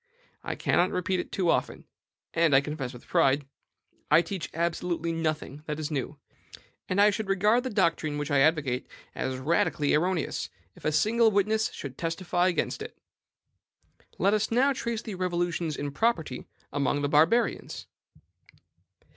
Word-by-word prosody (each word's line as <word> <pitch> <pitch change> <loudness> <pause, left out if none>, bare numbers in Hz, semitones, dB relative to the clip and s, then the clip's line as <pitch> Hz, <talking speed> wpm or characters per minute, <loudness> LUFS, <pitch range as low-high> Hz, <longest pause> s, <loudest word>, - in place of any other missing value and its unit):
I - - -3
cannot 180 +1 +2
repeat 180 +1 -1
it - - -5
too 180 -3 +1
often, - - -1 0.5
and 165 -4 +3
I 135 - +6
confess 145 -3 -4
it - - -11
with 120 - -14
pride, 135 +1 +2 0.6
I 155 +3 +6
teach 175 0 -5
absolutely 170 0 -1
nothing 155 -3 -3
that 150 0 -3
is 155 0 -4
new; 145 +1 -3 0.7
and 185 - 0
I 210 +1 +6
should 210 -1 -4
regard 210 +5 +3
the 260 - -3
doctrine 165 -7 +1
which 145 -1 -3
I 140 - +4
advocate 140 -4 +2 0.3
as 130 0 -3
radically 145 +1 +1
erroneous, 170 +1 0 0.3
if - - -15
a 155 - +2
single 220 +9 +3
witness 215 +2 +1
should 135 -2 -8
testify 175 +2 0
against 175 -4 -1
it. - - -8 1.2
Let 200 +3 +3
us 215 0 +1
now 265 +4 +3
trace 235 -3 -3
the 220 - -6
revolutions 175 -3 -1
in 145 0 -3
property 160 - -1 0.3
among 145 0 0
the - - +2
Barbarians. 160 +11 +2
165 Hz, 155 wpm, -28 LUFS, 150-195 Hz, 1.2 s, I